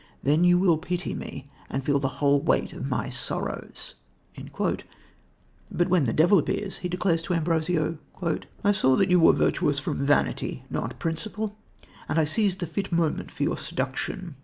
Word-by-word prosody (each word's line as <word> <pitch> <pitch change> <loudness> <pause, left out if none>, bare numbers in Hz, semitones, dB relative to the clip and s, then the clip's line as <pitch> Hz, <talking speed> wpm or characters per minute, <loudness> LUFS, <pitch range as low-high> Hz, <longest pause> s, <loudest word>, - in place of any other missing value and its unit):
Then 150 +5 +3
you 175 0 +6
will 175 -4 +3
pity 180 +1 -3
me 140 0 -7 0.2
and 135 0 -3
feel 140 -1 +2
the 135 - 0
whole 140 -1 +3
weight - - +1
of - - -5
my - - -1
sorrows." - - -3 1.8
But 175 +1 0
when 175 -5 +3
the 115 - +1
devil 175 - +5
appears, 195 +6 -2
he 180 - -3
declares 175 -2 +1
to 175 +2 -1
Ambrosio: 165 -1 0 0.6
"I 205 - +5
saw 130 -10 +3
that 190 +3 +2
you 180 - +6
were 165 - +7
virtuous 145 -1 +1
from 140 -1 -2
vanity, 145 +1 +1
not - - -3
principle, 180 +6 -2 0.5
and - - 0
I 160 - +5
seized 190 +4 0
the - - 0
fit 195 +3 -4
moment 165 -2 0
for - - -4
your - - 0
seduction. 135 +4 -3
165 Hz, 170 wpm, -26 LUFS, 145-180 Hz, 1.8 s, were